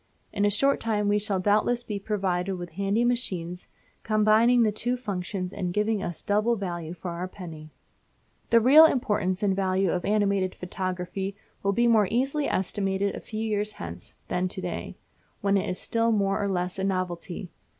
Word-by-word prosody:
In 205 Hz, -, +1 dB
a -, -, +4 dB
short 275 Hz, +7 st, +3 dB
time 210 Hz, -2 st, 0 dB
we 205 Hz, 0 st, +3 dB
shall 200 Hz, -2 st, -1 dB
doubtless 215 Hz, +5 st, +2 dB
be 210 Hz, -4 st, -4 dB
provided 195 Hz, -2 st, -1 dB
with 175 Hz, -2 st, -7 dB
handy 200 Hz, +6 st, 0 dB
machines 185 Hz, -8 st, -2 dB, 0.3 s
combining 220 Hz, +3 st, +4 dB
the 215 Hz, -, +3 dB
two 245 Hz, +4 st, -1 dB
functions 190 Hz, -4 st, -4 dB
and 180 Hz, -2 st, -3 dB
giving 210 Hz, 0 st, +1 dB
us 175 Hz, -3 st, -5 dB
double 215 Hz, +3 st, +2 dB
value 175 Hz, -5 st, -4 dB
for 175 Hz, +1 st, -6 dB
our 175 Hz, +2 st, -4 dB
penny. 165 Hz, -5 st, -9 dB, 0.8 s
The 230 Hz, -, +6 dB
real 290 Hz, +7 st, +9 dB
importance 205 Hz, -9 st, +1 dB
and 195 Hz, -2 st, +2 dB
value 190 Hz, -1 st, +1 dB
of 180 Hz, -, -1 dB
animated 200 Hz, -2 st, +1 dB
photography 185 Hz, +1 st, -4 dB, 0.3 s
will 200 Hz, 0 st, +1 dB
be 240 Hz, +4 st, +2 dB
more 220 Hz, -4 st, +4 dB
easily 270 Hz, +5 st, 0 dB
estimated 195 Hz, +1 st, -1 dB
a -, -, -5 dB
few 215 Hz, 0 st, -6 dB
years 210 Hz, -1 st, -1 dB
hence 85 Hz, +1 st, -9 dB
than 180 Hz, +1 st, 0 dB
to -, -, -5 dB
day, -, -, -5 dB, 0.4 s
when 200 Hz, 0 st, +2 dB
it 195 Hz, -, 0 dB
is 180 Hz, -, -3 dB
still 230 Hz, 0 st, 0 dB
more 200 Hz, -2 st, +1 dB
or 200 Hz, -, 0 dB
less 180 Hz, 0 st, -2 dB
of 190 Hz, -, 0 dB
a -, -, +2 dB
novelty. 180 Hz, -1 st, -3 dB
200 Hz, 180 wpm, -26 LUFS, 185-215 Hz, 0.8 s, real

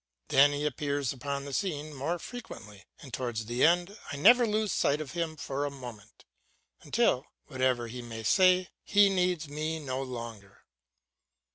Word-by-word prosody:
Then 145 Hz, +2 st, +6 dB
he 145 Hz, +1 st, -2 dB
appears 145 Hz, -2 st, -1 dB
upon 140 Hz, +1 st, -4 dB
the 140 Hz, -, -7 dB
scene 155 Hz, -4 st, -2 dB
more 145 Hz, +6 st, -2 dB
frequently, 135 Hz, -, -10 dB, 0.2 s
and 130 Hz, -4 st, -12 dB
towards 115 Hz, -2 st, -3 dB
the 120 Hz, +3 st, -1 dB
end 175 Hz, +4 st, +3 dB, 0.2 s
I -, -, -4 dB
never 235 Hz, -, +6 dB
lose 215 Hz, -1 st, 0 dB
sight 145 Hz, +2 st, +2 dB
of 150 Hz, -3 st, -6 dB
him 165 Hz, -1 st, -2 dB
for 140 Hz, -1 st, -3 dB
a 145 Hz, -, -1 dB
moment, 120 Hz, -6 st, -11 dB, 0.6 s
until, -, -, +1 dB, 0.2 s
whatever 130 Hz, -2 st, 0 dB
he 125 Hz, +2 st, -7 dB
may 115 Hz, -2 st, -7 dB
say, 185 Hz, -, +4 dB
he 205 Hz, -1 st, +5 dB
needs 180 Hz, -4 st, 0 dB
me 155 Hz, +2 st, -3 dB
no 130 Hz, -3 st, -3 dB
longer. 115 Hz, -6 st, -8 dB
145 Hz, 160 wpm, -29 LUFS, 125-175 Hz, 0.6 s, Then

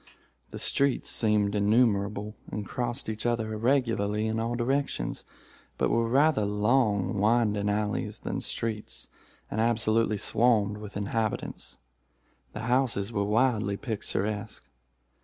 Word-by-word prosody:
The -, -, -7 dB
streets 140 Hz, -1 st, +1 dB
seemed 105 Hz, -2 st, +2 dB
innumerable, 105 Hz, -1 st, +2 dB, 0.2 s
and 105 Hz, -, -4 dB
crossed 120 Hz, +3 st, -3 dB
each 110 Hz, +2 st, -2 dB
other 115 Hz, -2 st, -1 dB
irregularly 110 Hz, -3 st, +1 dB
in 110 Hz, 0 st, -1 dB
all 115 Hz, +1 st, -1 dB
directions, 125 Hz, -, -1 dB, 0.5 s
but -, -, +1 dB
were 115 Hz, 0 st, +2 dB
rather 140 Hz, -2 st, +3 dB
long 105 Hz, -2 st, +1 dB
winding 105 Hz, -1 st, +2 dB
alleys 105 Hz, 0 st, -1 dB
than -, -, -3 dB
streets, 110 Hz, -2 st, -4 dB, 0.4 s
and 110 Hz, -, 0 dB
absolutely 115 Hz, -1 st, +2 dB
swarmed 105 Hz, -1 st, +2 dB
with 105 Hz, -1 st, -7 dB
inhabitants. 110 Hz, +1 st, -3 dB, 0.8 s
The 110 Hz, -, -5 dB
houses 120 Hz, -3 st, 0 dB
were 100 Hz, -2 st, 0 dB
wildly 105 Hz, -2 st, +1 dB
picturesque. 105 Hz, -2 st, -3 dB
110 Hz, 120 wpm, -28 LUFS, 105-120 Hz, 0.8 s, rather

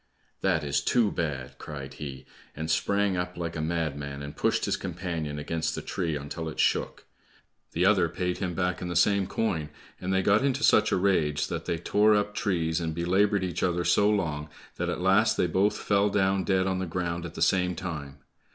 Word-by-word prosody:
"That 90 Hz, -5 st, +1 dB
is 70 Hz, -1 st, 0 dB
too 115 Hz, -4 st, +2 dB
bad!" 70 Hz, -6 st, -4 dB
cried 70 Hz, -3 st, -7 dB
he, 70 Hz, -3 st, -7 dB, 0.3 s
and 80 Hz, +1 st, -3 dB
sprang 100 Hz, +4 st, +1 dB
up 90 Hz, 0 st, -3 dB
like 85 Hz, -1 st, -4 dB
a 80 Hz, -, -2 dB
madman, 75 Hz, -4 st, -3 dB
and 70 Hz, +1 st, -7 dB
pushed -, -, +1 dB
his -, -, +1 dB
companion 85 Hz, -5 st, -4 dB
against 80 Hz, +2 st, -2 dB
the -, -, -4 dB
tree 85 Hz, -5 st, -2 dB
until 75 Hz, +3 st, -5 dB
it -, -, -9 dB
shook. -, -, 0 dB, 0.7 s
The 90 Hz, +3 st, +2 dB
other 95 Hz, -4 st, +4 dB
paid 90 Hz, +1 st, -2 dB
him 90 Hz, -4 st, -2 dB
back 90 Hz, -1 st, -1 dB
in 90 Hz, -, -3 dB
the 85 Hz, -, -4 dB
same 100 Hz, +2 st, +3 dB
coin, 85 Hz, -9 st, -1 dB, 0.3 s
and 90 Hz, -, -3 dB
they 95 Hz, 0 st, +2 dB
got 105 Hz, +5 st, +4 dB
into 140 Hz, +1 st, 0 dB
such -, -, +5 dB
a -, -, +3 dB
rage 85 Hz, -6 st, +1 dB
that -, -, -4 dB
they 85 Hz, -, -1 dB
tore 105 Hz, +5 st, +3 dB
up 105 Hz, 0 st, 0 dB
trees 85 Hz, -6 st, 0 dB
and 80 Hz, -1 st, -3 dB
belabored 95 Hz, +4 st, +2 dB
each 90 Hz, -2 st, -3 dB
other 90 Hz, -1 st, +1 dB
so 100 Hz, +4 st, +4 dB
long, 80 Hz, -8 st, -1 dB, 0.3 s
that -, -, -1 dB
at -, -, -3 dB
last 95 Hz, +4 st, +3 dB
they -, -, +3 dB
both 95 Hz, +4 st, +1 dB
fell 100 Hz, 0 st, +2 dB
down 95 Hz, -2 st, +1 dB
dead 95 Hz, +1 st, +2 dB
on 95 Hz, -1 st, 0 dB
the 95 Hz, -, -2 dB
ground 85 Hz, 0 st, -2 dB
at 85 Hz, -, -7 dB
the -, -, -6 dB
same 90 Hz, -1 st, +2 dB
time. 75 Hz, -6 st, -6 dB
90 Hz, 205 wpm, -27 LUFS, 80-95 Hz, 0.7 s, such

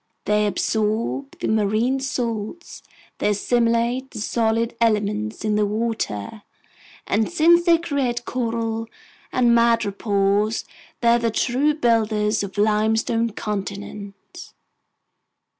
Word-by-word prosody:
They 210 Hz, 0 st, +2 dB
absorb 205 Hz, -, -1 dB
the -, -, -2 dB
marine 220 Hz, +5 st, +1 dB
salts, 245 Hz, +3 st, -4 dB, 0.4 s
they -, -, +1 dB
assimilate 235 Hz, +4 st, +1 dB
the 230 Hz, -, -8 dB
solid 230 Hz, +1 st, 0 dB
elements 215 Hz, -1 st, 0 dB
in 210 Hz, -1 st, +1 dB
the 210 Hz, -, +2 dB
water, 215 Hz, -, -3 dB, 0.6 s
and 220 Hz, +6 st, 0 dB
since 345 Hz, +1 st, +4 dB
they 335 Hz, -1 st, +6 dB
create 270 Hz, -7 st, -2 dB
coral 230 Hz, -2 st, -2 dB, 0.4 s
and 240 Hz, -2 st, +3 dB
madrepores, 210 Hz, -2 st, +1 dB, 0.4 s
they're 235 Hz, 0 st, +4 dB
the 235 Hz, -1 st, +1 dB
true 265 Hz, +7 st, +1 dB
builders 220 Hz, -5 st, +1 dB
of 200 Hz, 0 st, -6 dB
limestone 220 Hz, +2 st, +1 dB
continents! 200 Hz, -, -7 dB
225 Hz, 105 wpm, -22 LUFS, 210-240 Hz, 0.6 s, they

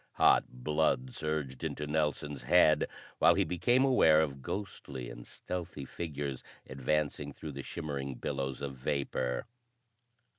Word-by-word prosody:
Hot -, -, +5 dB
blood 65 Hz, -1 st, 0 dB
surged 75 Hz, -4 st, -3 dB
into 75 Hz, -, -2 dB
Nelson's 75 Hz, -2 st, -1 dB
head 75 Hz, +3 st, +5 dB, 0.3 s
while -, -, +6 dB
he -, -, +3 dB
became 120 Hz, +9 st, +3 dB
aware 80 Hz, -, +6 dB
of 70 Hz, -4 st, -1 dB
ghostly 65 Hz, -9 st, -5 dB
and -, -, -10 dB
stealthy 85 Hz, -6 st, -5 dB
figures 70 Hz, -4 st, -4 dB, 0.2 s
advancing 75 Hz, +2 st, -1 dB
through 75 Hz, +2 st, -7 dB
the 70 Hz, -1 st, -6 dB
shimmering 70 Hz, -3 st, -4 dB
billows 65 Hz, +2 st, -3 dB
of 70 Hz, -1 st, -3 dB
vapor. 65 Hz, -2 st, -1 dB
70 Hz, 125 wpm, -32 LUFS, 65-80 Hz, 0.3 s, while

